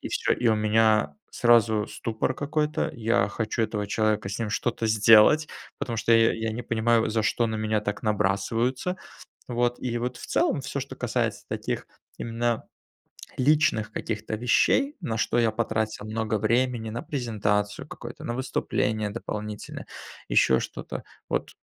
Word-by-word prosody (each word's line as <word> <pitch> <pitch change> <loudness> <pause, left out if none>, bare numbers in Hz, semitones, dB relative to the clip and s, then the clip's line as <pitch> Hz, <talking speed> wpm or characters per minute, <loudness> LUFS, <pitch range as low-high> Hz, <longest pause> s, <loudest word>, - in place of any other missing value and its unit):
и - - -5
всё. - - 0
И 120 - 0
у 110 - +4
меня 110 - +3
сразу 115 -3 +3
ступор 115 +3 -2
какой-то, 150 +1 -1
я 115 -4 +1
хочу 110 +2 -3
этого 105 -2 -2
человека, 105 -1 +1
с 100 - -4
ним 115 -2 -2
что-то 115 +1 -1
сделать, 110 +7 +6 0.3
потому 120 -5 -3
что 115 +1 +2
я 115 0 +5
я 110 0 -2
не 120 +2 -4
понимаю, 115 0 +2
за 110 0 +1
что 115 +3 +1
на 110 0 -2
меня 110 0 0
так 105 -1 -4
набрасываются, 110 - 0 0.5
вот. 120 0 0
И 120 -2 -3
вот, 125 +1 -3
в - - -9
целом, - - +1
всё, - - -3
что - - -7
касается - - -1
таких - - -3 0.3
именно 115 0 -1 0.7
личных 130 -6 +2
каких-то 110 0 -4
вещей, 200 - +2
на 115 -8 -2
что 120 - 0
я 115 -2 +3
потратил 110 -2 -2
много 110 -1 -1
времени: 115 0 +1
на 115 +2 -5
презентацию 105 -6 -1
какую-то, - - -9
на 120 - -3
выступление 110 -4 -1
дополнительное, 105 -1 -6 0.4
ещё 65 +2 +4
что-то- - - -6 0.3
вот - - -1
110 Hz, 155 wpm, -26 LUFS, 110-120 Hz, 0.7 s, сделать